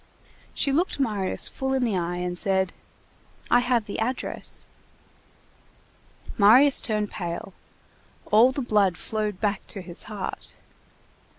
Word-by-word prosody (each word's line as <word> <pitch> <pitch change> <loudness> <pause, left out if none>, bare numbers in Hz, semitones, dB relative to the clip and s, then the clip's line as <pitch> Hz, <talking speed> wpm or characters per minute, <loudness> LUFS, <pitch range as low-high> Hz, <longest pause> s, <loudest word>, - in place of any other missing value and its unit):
She 280 - +1
looked 325 +2 0
Marius 210 -8 0
full 265 0 -3
in 260 - +1
the 225 -5 0
eye, 175 -1 -1
and 180 0 -3
said:— 190 0 0 0.8
"I 245 - +7
have 245 -3 +1
the 205 - -5
address." 245 +4 -4 1.7
Marius 255 +8 +6
turned 210 -2 0
pale. 175 +1 -5 0.8
All 225 +5 +6
the 275 0 -3
blood 200 -6 +2
flowed 215 -3 -3
back 205 -2 -1
to 200 - -6
his 175 -1 -7
heart. 205 -3 -6
210 Hz, 125 wpm, -25 LUFS, 190-245 Hz, 1.7 s, I